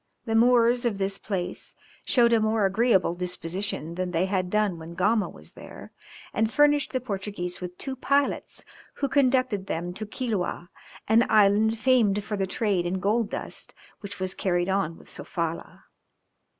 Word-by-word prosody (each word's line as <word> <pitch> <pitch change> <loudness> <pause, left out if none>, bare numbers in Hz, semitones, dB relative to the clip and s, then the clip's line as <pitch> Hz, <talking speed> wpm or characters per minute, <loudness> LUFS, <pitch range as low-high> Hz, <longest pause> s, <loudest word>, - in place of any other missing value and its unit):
The 225 - -2
Moors 240 +1 +4
of 230 -5 0
this 195 0 -2
place 185 -4 -3 0.3
showed 235 -3 +3
a 230 - +5
more 215 -1 +2
agreeable 195 -2 +2
disposition 180 -1 -4
than 180 +1 -2
they 175 +1 +1
had 190 -2 -1
done 210 -4 +1
when 165 +1 -9
Gama 200 +1 +2
was 75 +1 -12
there, - - -11 0.4
and 220 +1 +1
furnished 295 +1 +3
the 255 - 0
Portuguese 195 -6 -5
with 180 0 -6
two 270 -1 -4
pilots, 280 +2 -1 0.3
who 280 - -1
conducted 255 -7 +2
them 175 0 -3
to 215 +3 -6
Quiloa, 205 -7 -3 0.4
an 230 +3 +4
island 215 +1 +4
famed 220 -4 +3
for 210 0 -3
the 195 -1 -1
trade 190 -3 0
in 190 +2 -2
gold 210 +3 +1
dust - - -6 0.2
which 200 -1 -8
was 185 0 -2
carried 175 -1 0
on 190 -4 0
with - - -17
Sofala. 165 -1 -5
205 Hz, 165 wpm, -26 LUFS, 180-230 Hz, 0.4 s, a